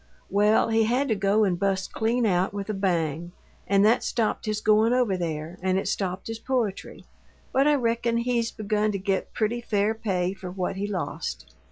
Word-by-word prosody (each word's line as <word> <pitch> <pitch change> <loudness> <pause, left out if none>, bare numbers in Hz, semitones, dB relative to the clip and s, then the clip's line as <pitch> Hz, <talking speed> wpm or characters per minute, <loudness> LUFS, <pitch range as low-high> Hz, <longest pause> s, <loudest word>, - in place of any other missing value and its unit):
Well, 210 +3 +3
he 225 0 +3
had 255 +5 +1
to 220 - +2
go 200 +2 +2
and 180 -4 +1
bust 195 -1 -1
clean 230 +2 +1
out 190 0 +1
with 200 +1 -3
a - - -3
bang; 170 -4 -1 0.3
and 200 +1 +4
that 225 +3 +4
stopped 225 -1 -1
his 215 0 0
goin' 215 +2 +3
over 245 -6 +2
there, 165 0 -4
and 185 0 +1
it 195 - -2
stopped 185 -1 -2
his 225 0 -5
poetry, 235 -7 -3 0.5
but 270 +2 +4
I 300 - +5
reckon 235 -2 0
he's 235 -1 0
begun 215 0 -1
to - - -1
get 190 0 -2
pretty 235 +2 0
fair 210 -2 +1
pay 190 -5 -1
for 190 -2 -8
what 185 0 -3
he 200 +1 -2
lost. 170 - -4
205 Hz, 195 wpm, -26 LUFS, 190-225 Hz, 0.5 s, I